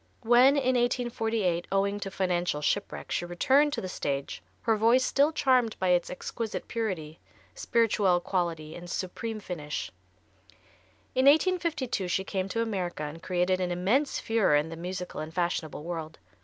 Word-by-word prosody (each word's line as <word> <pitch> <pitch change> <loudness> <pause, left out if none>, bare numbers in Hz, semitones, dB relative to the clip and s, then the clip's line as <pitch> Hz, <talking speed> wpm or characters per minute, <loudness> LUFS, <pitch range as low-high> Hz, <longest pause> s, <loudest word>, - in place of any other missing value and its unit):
When, 250 +4 +5
in 260 -2 +2
1848, 225 -7 0
owing 200 +1 +1
to 200 - -4
financial 180 -4 -1
shipwreck, 205 +7 -2
she - - 0
returned 265 +12 +3
to - - -2
the 185 - -4
stage 140 - -3 0.2
her 225 - +3
voice 230 +4 +4
still 285 +3 +3
charmed 255 -7 +2
by 185 - 0
its 175 -1 +2
exquisite 220 +4 -5
purity, 180 -9 -3 0.3
spirituelle 215 - +2
quality 170 -4 -2
and 175 +1 -9
supreme 215 +5 -4
finish. 155 -7 -5 1.2
In 260 +1 +2
1852 315 - +2
she 190 +2 0
came 190 -1 -3
to 230 +4 0
America 185 -8 -3
and 150 +2 -6
created 185 +1 0
an 180 - 0
immense 200 +12 +1
furore 225 -9 +2
in 150 +2 +1
the 165 - -6
musical 180 0 -5
and 155 +1 -6
fashionable 170 -3 -2
world. 160 -2 -5
190 Hz, 155 wpm, -28 LUFS, 175-230 Hz, 1.2 s, When